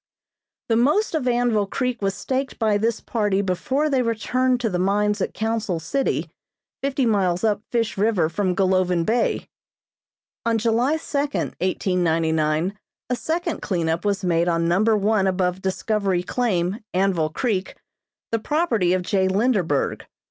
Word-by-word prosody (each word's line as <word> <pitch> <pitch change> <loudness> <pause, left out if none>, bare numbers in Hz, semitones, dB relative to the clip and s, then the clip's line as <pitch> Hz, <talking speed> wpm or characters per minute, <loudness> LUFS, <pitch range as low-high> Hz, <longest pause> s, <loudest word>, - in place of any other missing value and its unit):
The 225 - +3
most 295 - +2
of 305 -6 -1
Anvil 240 -4 +2
Creek 250 +1 -2
was 195 -1 0
staked 265 +1 -3
by 215 -3 +2
this 230 +1 0
party 205 -4 0
before 260 +11 0
they 270 -4 +2
returned 250 +2 0
to 230 - 0
the 180 - -1
mines 205 +2 +1
at - - -2
Council 220 -5 -1
City, 265 - -1 0.5
fifty 275 -1 0
miles 190 -5 +1
up 210 -2 +1
Fish 230 -4 -1
River 200 -6 +2
from 180 +2 -1
Golovin 185 -3 +2
Bay. 230 +4 0 1.0
"On 230 -1 +1
July 235 +7 +1
second, 290 -2 -2
1899, 165 -1 0 0.3
a - - +2
second 335 +5 -2
cleanup 170 -3 -1
was 200 -1 0
made 170 -1 +2
on 165 -1 +1
number 210 +6 +3
one 205 -1 +2
above 185 0 0
Discovery 190 -1 0
Claim, 190 -3 -1 0.2
Anvil 185 -5 +2
Creek, 195 +2 -2 0.6
the 230 - +1
property 230 - +1
of 185 -1 0
J. 190 0 +1
Linderberg. 190 - +1
205 Hz, 145 wpm, -23 LUFS, 180-240 Hz, 1.0 s, The